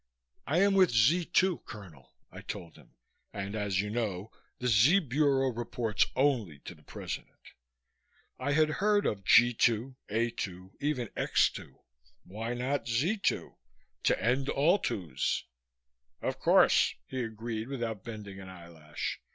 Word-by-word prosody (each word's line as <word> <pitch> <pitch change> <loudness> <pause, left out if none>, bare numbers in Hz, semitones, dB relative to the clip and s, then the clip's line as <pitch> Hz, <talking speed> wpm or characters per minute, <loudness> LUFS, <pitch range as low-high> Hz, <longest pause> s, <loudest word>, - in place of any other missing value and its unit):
"I 160 +7 +2
am 200 0 +4
with 190 -3 +5
Z 135 +11 +3
2, 185 +1 +2
Colonel," 85 -11 -13 0.2
I - - -10
told 85 -2 -7
him, - - -20 0.4
"and 100 +1 -5
as 100 -3 0
you 105 0 -4
know 110 -3 -3 0.3
the 125 - -3
Z 125 - +5
Bureau 135 -2 +2
reports 115 -2 -1
only 125 - +1
to - - -7
the - - -21
President." - - -8 0.9
I 140 +2 -1
had 155 +1 +3
heard 205 0 +3
of 100 -2 -1
G 120 +5 +6
2, 120 +3 +1
A 115 +3 0
2, 95 -2 -6
even 135 -6 -2
X - - +2
2. - - -11 0.5
Why 115 +5 -5
not 130 +3 -2
Z 140 - +1
2 200 - -1 0.5
to - - +3
end 130 +4 +1
all 170 +8 +3
2's. 90 - -2 0.8
"Of - - -3
course," - - +4
he 130 - -4
agreed 110 0 -5
without 115 -6 -4
bending 105 -4 -8
an 95 -1 -10
eyelash. 85 -4 -6
115 Hz, 150 wpm, -30 LUFS, 100-140 Hz, 0.9 s, G